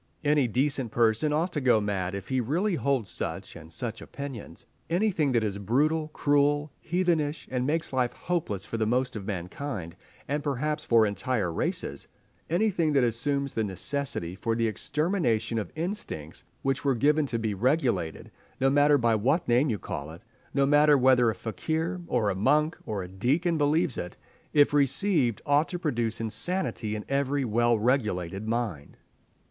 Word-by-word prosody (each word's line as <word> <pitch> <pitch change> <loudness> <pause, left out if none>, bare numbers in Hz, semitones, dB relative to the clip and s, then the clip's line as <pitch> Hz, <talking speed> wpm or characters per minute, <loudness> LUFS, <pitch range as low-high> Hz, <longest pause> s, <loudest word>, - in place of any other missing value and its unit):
Any 145 -3 +3
decent 130 0 0
person 115 +6 +2
ought 165 +4 0
to 150 - -1
go 125 -4 +4
mad 100 -3 -2
if 100 -1 -7
he 130 -1 +1
really 175 - 0
holds 140 - 0
such - - -5
and 80 -1 -11
such 115 +6 -4
opinions…. 130 - -8 0.2
Anything 175 -5 +1
that 115 -2 +2
is 100 -2 -2
brutal, 150 +10 +1
cruel, 145 0 +1
heathenish, 165 -4 0
that 125 -1 0
makes 150 +3 -1
life 125 -2 +1
hopeless 150 - -3
for 115 - -4
the 110 -1 0
most 125 +2 0
of 100 -2 -6
mankind, 90 - -5 0.3
and 145 +2 -1
perhaps 150 +2 -1
for 115 -2 +4
entire 100 -2 -1
races—anything 170 - -2
that 135 -3 +4
assumes 140 +4 0
the 110 - 0
necessity 105 -1 -3
for 115 +5 -2
the 115 0 +1
extermination 115 - 0
of 105 - -5
instincts 160 - -4 0.2
which 135 0 0
were 135 -2 +2
given 145 +4 +2
to 120 - -2
be 110 -2 -1
regulated—no 125 - -1
matter 145 +1 +5
by 120 -3 +2
what 135 +11 +1
name 125 +5 +3
you 110 - 0
call 70 -5 -6
it—no 115 - -4
matter 145 +1 +5
whether 125 -2 +5
a 110 - -2
fakir, 160 - -3
or 110 -5 +1
a - - -3
monk, 150 +11 +2
or 100 -3 -2
a - - -7
deacon 140 - 0
believes 155 0 +1
it—if 145 +11 -1
received, 140 - +2
ought 145 +2 +3
to 175 - -3
produce 120 -9 -1
insanity 115 - -2
in 105 - -6
every 140 0 0
well 120 +1 +2
regulated 105 -5 0
mind." 110 -11 -3
130 Hz, 160 wpm, -27 LUFS, 110-150 Hz, 0.3 s, matter